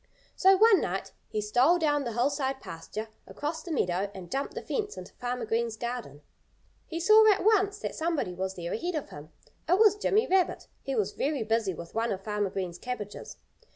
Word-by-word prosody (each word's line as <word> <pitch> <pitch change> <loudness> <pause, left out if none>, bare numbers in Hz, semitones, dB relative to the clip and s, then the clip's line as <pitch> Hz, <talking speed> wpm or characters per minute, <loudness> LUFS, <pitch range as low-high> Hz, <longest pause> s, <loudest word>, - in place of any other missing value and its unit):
So 385 0 +5
one 440 -1 +6
night - - -3 0.2
he 215 - -2
stole 250 +11 +4
down 290 -4 +1
the 235 - -3
hillside 270 +2 0
pasture, 215 +6 -7 0.2
across 315 +2 -4
the 345 - -7
meadow, 190 - 0
and 180 -2 -9
jumped 275 +1 -2
the - - -5
fence 420 -2 -3
into - - -9
Farmer 245 -1 -3
Green's 225 0 -1
garden. 235 - -5 0.6
He 330 - -4
saw 430 +4 +7
at 395 - +1
once 405 -1 +3
that - - -4
somebody 320 - -1
was 190 +1 -3
there 170 -1 -4
ahead 345 +9 -2
of 300 - -4
him. 145 +1 -10 0.4
It 360 - +5
was 420 -1 +6
Jimmy 415 +1 +2
Rabbit. 375 -1 +1
He 270 -1 -3
was 210 -5 0
very 285 -3 -1
busy 220 -4 0
with 170 0 -9
one 230 +1 0
of 195 0 -4
Farmer 210 -1 -1
Green's 185 -3 -4
cabbages. 220 -5 -6
250 Hz, 195 wpm, -28 LUFS, 205-345 Hz, 0.6 s, saw